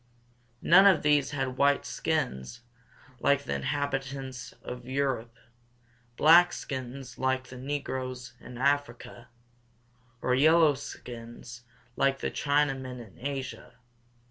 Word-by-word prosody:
None 190 +3 +7
of 190 -4 +4
these 145 -2 +3
had 135 -3 -3
white 140 0 +3
skins 125 - -2 0.6
like 140 +3 +2
the - - -3
inhabitants 135 -3 -3
of 125 0 -8
Europe, 130 -4 -2 0.8
black 170 +3 +7
skins 130 -1 -6
like 130 -1 0
the 125 - -9
negroes 130 -2 -4
in 125 - -11
Africa, 130 -3 -1 0.9
or 125 - 0
yellow 155 +3 +5
skins 120 -2 -9 0.3
like 135 0 +2
the - - -3
Chinamen 135 -3 0
in 115 0 -13
Asia. 135 -1 -5
135 Hz, 110 wpm, -28 LUFS, 125-145 Hz, 0.9 s, None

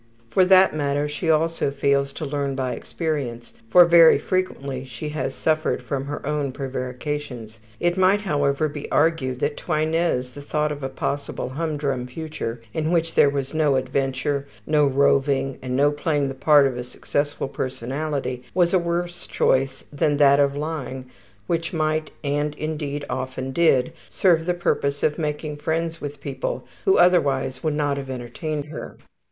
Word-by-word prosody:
For 185 - +4
that 190 0 +6
matter, 145 0 0
she 155 +3 -3
also 160 -1 +2
fails 140 0 +1
to 155 - -5
learn 140 -1 -2
by 130 -2 -2
experience, 140 -8 -4 0.2
for 175 +6 +8
very 170 -2 +7
frequently 140 -6 -2
she 130 +3 -6
has 155 +1 -3
suffered 155 0 0
from 135 -2 -3
her 145 0 -5
own 145 -2 -1
prevarications. 130 -3 -5 0.2
It 175 +1 +1
might, 190 +2 +4
however, 145 -5 +1
be 145 -1 -7
argued 145 -5 +1
that 145 +1 0
to 175 - -3
Inez 155 -5 0
the 145 - -9
thought 150 +1 -1
of 145 -1 -5
a 135 - -3
possible 140 -1 -3
hum 155 +3 -2
drum 135 -4 -2
future 125 -5 -5
in 155 0 -1
which 165 -1 +1
there 145 - +5
was 140 0 -3
no 155 -3 +2
adventure, 135 +2 -1 0.2
no 150 -1 +3
roving, 135 0 +2
and 125 -1 -3
no 145 +2 +4
playing 145 -1 0
the - - -4
part 145 +1 +5
of 130 -2 -1
a 125 - -3
successful 145 +3 -2
personality, 130 0 -3
was 175 -1 +3
a 185 - +5
worse 175 +1 -3
choice 135 0 +1
than 145 0 +1
that 140 -1 +6
of 140 0 +2
lying, 135 -4 -5 0.3
which 165 +2 -2
might 155 -1 0
and, 145 +1 -1
indeed, 150 -2 -4
often 130 0 -4
did 140 -2 +3 0.2
serve 170 -3 +2
the 180 - +1
purpose 140 -5 -1
of 150 +2 +1
making 150 -1 -3
friends 165 +2 -2
with 145 -1 -6
people, - - -4 0.2
who 390 - +5
otherwise 135 -7 +3
would 155 -2 0
not 145 -2 0
have 135 -1 -6
entertained 135 +4 -4
her. 150 0 -8
145 Hz, 170 wpm, -23 LUFS, 135-160 Hz, 0.3 s, for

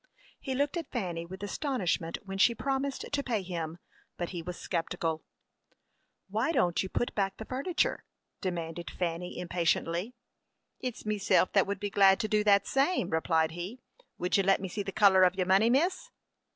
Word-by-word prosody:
He 265 -2 -3
looked 285 +5 0
at 335 - -5
Fanny 175 -8 -3
with 190 +3 -9
astonishment 200 - -1
when 195 0 -5
she 235 +5 +5
promised 275 +1 -2
to 285 0 +1
pay 230 -7 -1
him, 170 -3 -4 0.4
but 175 - -3
he 175 -2 -5
was 175 +1 -6
sceptical. 165 -1 -2 1.1
"Why 220 +9 0
don't 180 - +2
you 190 - -4
put 240 - -1
back 195 -1 -1
the 220 - -7
furniture?" 275 +9 -1 0.4
demanded 170 -2 -4
Fanny, 175 0 -3
impatiently. 175 +4 -1 0.6
"It's 250 -4 -5
meself 205 -3 +2
that 195 -2 +4
would 200 -1 -2
be 205 0 -3
glad 195 -1 +5
to 215 - -1
do 210 0 +2
that 200 -1 +5
same," 275 - +1
replied 160 0 +2
he. 180 +9 -6 0.4
"Would 180 +2 +1
you - - +4
let 195 0 +3
me 190 - -4
see 205 +3 -4
the 195 - -4
color 195 -2 +5
of 185 0 +5
your 185 -1 0
money, 195 +5 +4
miss?" 335 +9 +1
195 Hz, 180 wpm, -30 LUFS, 175-235 Hz, 1.1 s, she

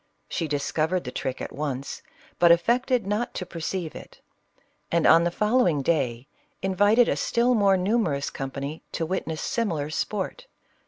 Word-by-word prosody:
She 165 - -2
discovered 155 +4 -1
the 125 - -6
trick 130 0 -4
at - - -5
once, 140 -2 -4 0.4
but 170 -1 +7
affected 240 +6 +2
not 210 +4 -2
to 185 - -3
perceive 170 0 -4
it; - - -11 0.7
and 170 -1 +2
on 165 - +7
the - - +2
fol 210 +8 +1
lowing 160 - +2
day 130 -5 0 0.4
invited 205 +5 +4
a - - +1
still 240 +2 +2
more 200 -4 +4
numerous 180 -8 0
company 140 +3 -5
to 165 - -1
witness 160 -2 -3
similar 160 -11 -1
sport. 210 - -3
170 Hz, 155 wpm, -25 LUFS, 150-210 Hz, 0.7 s, but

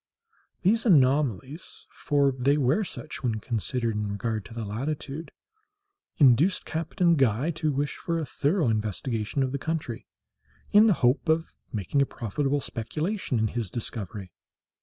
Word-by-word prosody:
These 225 +6 +3
anomalies—for 140 - +1
they 140 +4 +3
were 145 +9 +2
such 155 -4 -6
when 120 -4 0
considered 115 +1 -2
in 105 -1 -2
regard 110 0 -3
to 105 - -11
the 115 - -3
latitude—induced 160 - -1
Captain 170 +2 +1
Guy 135 +1 +2
to 155 -1 -1
wish 140 +1 -2
for 170 -1 -2
a 160 - -2
thorough 150 +2 +1
investigation 110 +3 -1
of 130 - -1
the 140 - -3
country, 150 -7 -4 0.6
in 210 +2 +7
the 210 - +5
hope 130 +6 +2
of 160 +1 +2 0.2
making 110 +7 0
a 140 - +2
profitable 140 +5 -1
speculation 150 - -2
in 110 0 +1
his 115 -3 -3
discovery. 100 -3 -5
140 Hz, 140 wpm, -27 LUFS, 115-160 Hz, 0.6 s, in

